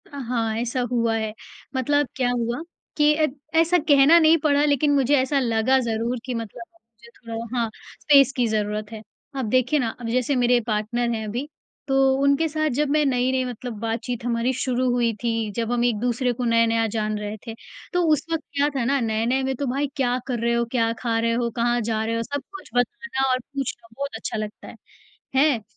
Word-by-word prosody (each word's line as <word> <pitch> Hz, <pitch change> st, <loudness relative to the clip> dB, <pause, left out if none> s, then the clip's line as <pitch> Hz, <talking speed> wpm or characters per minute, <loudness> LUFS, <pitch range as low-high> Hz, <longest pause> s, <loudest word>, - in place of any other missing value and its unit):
अ, 285 Hz, -, -10 dB
हाँ, 230 Hz, -4 st, -1 dB
ऐसा 245 Hz, +1 st, -1 dB
हुआ 230 Hz, -2 st, +1 dB
है, 220 Hz, -1 st, -3 dB, 0.4 s
मतलब 290 Hz, +2 st, +1 dB
क्या 250 Hz, -2 st, +1 dB
हुआ 240 Hz, +2 st, -2 dB, 0.4 s
कि 300 Hz, 0 st, +5 dB
अ, 310 Hz, 0 st, +2 dB, 0.3 s
ऐसा 335 Hz, +2 st, +4 dB
कहना 285 Hz, +3 st, +7 dB
नहीं 320 Hz, 0 st, +6 dB
पड़ा 290 Hz, -1 st, +3 dB
लेकिन 290 Hz, 0 st, +2 dB
मुझे 275 Hz, +1 st, +3 dB
ऐसा 275 Hz, +2 st, +1 dB
लगा 240 Hz, +1 st, +2 dB
ज़रूर 235 Hz, 0 st, -2 dB
कि 255 Hz, -, -3 dB
मतलब 230 Hz, -1 st, -6 dB
मुझे 235 Hz, -7 st, -21 dB
थोड़ा 230 Hz, +1 st, -6 dB
हाँ, 230 Hz, -1 st, 0 dB, 0.3 s
स्पेस 275 Hz, -3 st, +6 dB
की 245 Hz, -2 st, +1 dB
ज़रूरत 210 Hz, 0 st, -2 dB
है। 220 Hz, -1 st, -7 dB, 0.4 s
अब 250 Hz, -5 st, -2 dB
देखिए 255 Hz, +5 st, +2 dB
ना, 240 Hz, -4 st, 0 dB
अब 240 Hz, -, -5 dB
जैसे 255 Hz, +3 st, +1 dB
मेरे 245 Hz, -1 st, +3 dB
पार्टनर 225 Hz, +2 st, -1 dB
हैं 220 Hz, -1 st, -4 dB
अभी 245 Hz, +7 st, -4 dB, 0.4 s
तो 270 Hz, -, +1 dB, 0.3 s
उनके 280 Hz, +3 st, +3 dB
साथ 310 Hz, 0 st, 0 dB
जब 295 Hz, +3 st, 0 dB
मैं 300 Hz, +1 st, +3 dB
नई-नई 260 Hz, 0 st, +1 dB
मतलब 245 Hz, 0 st, -6 dB
बातचीत 230 Hz, +2 st, -3 dB
हमारी 235 Hz, +1 st, +1 dB
शुरू 255 Hz, 0 st, 0 dB
हुई 240 Hz, -2 st, +1 dB
थी, 225 Hz, -2 st, -1 dB
जब 230 Hz, 0 st, -2 dB
हम 240 Hz, 0 st, +1 dB
एक-दूसरे 245 Hz, +2 st, 0 dB
को 245 Hz, -, -4 dB
नया-नया 230 Hz, -1 st, +3 dB
जान 215 Hz, 0 st, -2 dB
रहे 210 Hz, +1 st, -5 dB
थे, 225 Hz, -, -4 dB, 0.4 s
तो 355 Hz, 0 st, +2 dB
उस 295 Hz, -, -1 dB
वक़्त 325 Hz, -1 st, -1 dB
क्या 285 Hz, +1 st, +2 dB
था 265 Hz, -, 0 dB
ना 275 Hz, +2 st, +2 dB
नए-नए 230 Hz, +3 st, 0 dB
में 265 Hz, 0 st, -1 dB
तो 280 Hz, -, -3 dB
भाई 280 Hz, +2 st, 0 dB
क्या 250 Hz, -3 st, +1 dB
कर 245 Hz, -3 st, -2 dB
रहे 235 Hz, +1 st, +1 dB
हो 235 Hz, 0 st, +1 dB
क्या 230 Hz, -3 st, +1 dB
खा 230 Hz, -2 st, 0 dB
रहे 230 Hz, 0 st, +1 dB
हो 235 Hz, 0 st, 0 dB
कहाँ 240 Hz, 0 st, +1 dB
जा 220 Hz, -1 st, -1 dB
रहे 230 Hz, +1 st, -1 dB
हो 230 Hz, -, -1 dB
सब 285 Hz, +4 st, -4 dB
कुछ 390 Hz, -, -10 dB
बताना 270 Hz, -, 0 dB
और 255 Hz, -, +2 dB
पूछना 255 Hz, -3 st, -6 dB
बहुत 280 Hz, +1 st, -5 dB
अच्छा 225 Hz, -, -4 dB
लगता 215 Hz, 0 st, -6 dB
है, -, -, -10 dB, 0.6 s
हैं। 270 Hz, -4 st, +3 dB
245 Hz, 205 wpm, -23 LUFS, 230-275 Hz, 0.6 s, कहना